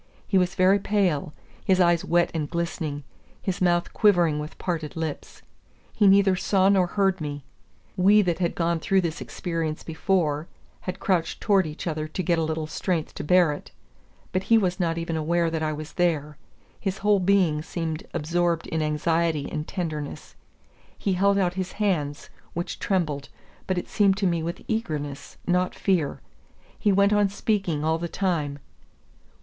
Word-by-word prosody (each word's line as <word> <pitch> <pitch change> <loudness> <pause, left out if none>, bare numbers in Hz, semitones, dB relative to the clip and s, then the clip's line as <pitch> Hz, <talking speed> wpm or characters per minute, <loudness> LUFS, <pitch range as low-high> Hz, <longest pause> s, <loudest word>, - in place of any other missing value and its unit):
He 195 - +3
was 180 +1 0
very 190 +2 +4
pale, 190 -6 0 0.3
his 190 -1 +3
eyes 175 -2 +4
wet 175 0 +2
and 155 -3 -2
glistening, 165 -4 -3 0.4
his 190 -2 -3
mouth 175 -1 +2
quivering 175 -7 +3
with 150 +1 -7
parted 160 -4 -3
lips. 160 -3 -5 0.5
He 210 - +4
neither 195 -1 +5
saw 190 +1 +2
nor 190 -3 +4
heard 195 -1 +1
me. 145 -2 -4 0.5
We 205 +3 +5
that 175 -2 -1
had 175 -2 0
gone 170 -1 0
through 190 +4 +2
this 165 -3 -3
experience 165 -3 -3
before, 160 -2 0 0.4
had 185 - -4
crouched 180 -4 0
towards 195 -5 +3
each 155 +1 -7
other 155 -2 -2
to 185 +4 -4
get 170 0 +2
a - - +1
little 160 0 -2
strength 165 +1 -2
to - - -6
bear 175 -1 +4
it. 145 - -9 0.6
But 185 - 0
he 230 +3 +5
was 185 -3 0
not 165 -2 0
even 165 0 -2
aware 165 +1 +1
that 160 -1 -2
I 155 -1 0
was 155 0 -7
there. 155 -4 0 0.4
His 195 -2 -2
whole 205 -1 +5
being 180 -5 +3
seemed 160 -1 -4
absorbed 170 +1 0
in 160 - -2
anxiety 155 0 0
and 150 0 -4
tenderness. 155 -6 -5 0.6
He 195 - 0
held 200 +2 +3
out 180 -3 +1
his 185 0 -4
hands, 160 -9 -1 0.2
which 170 +1 -4
trembled, 155 -8 -1 0.4
but 185 - 0
it 175 - -3
seemed 195 -2 +3
to 200 - 0
me 170 -2 +1
with 170 +2 -5
eagerness, 150 -10 -3
not 180 0 +1
fear. 175 -8 0 0.6
He 210 - +3
went 200 +1 +4
on 205 -1 +3
speaking 195 -6 -1
all 160 +1 +1
the 170 - -3
time. 165 -7 -1
175 Hz, 170 wpm, -25 LUFS, 155-190 Hz, 0.6 s, neither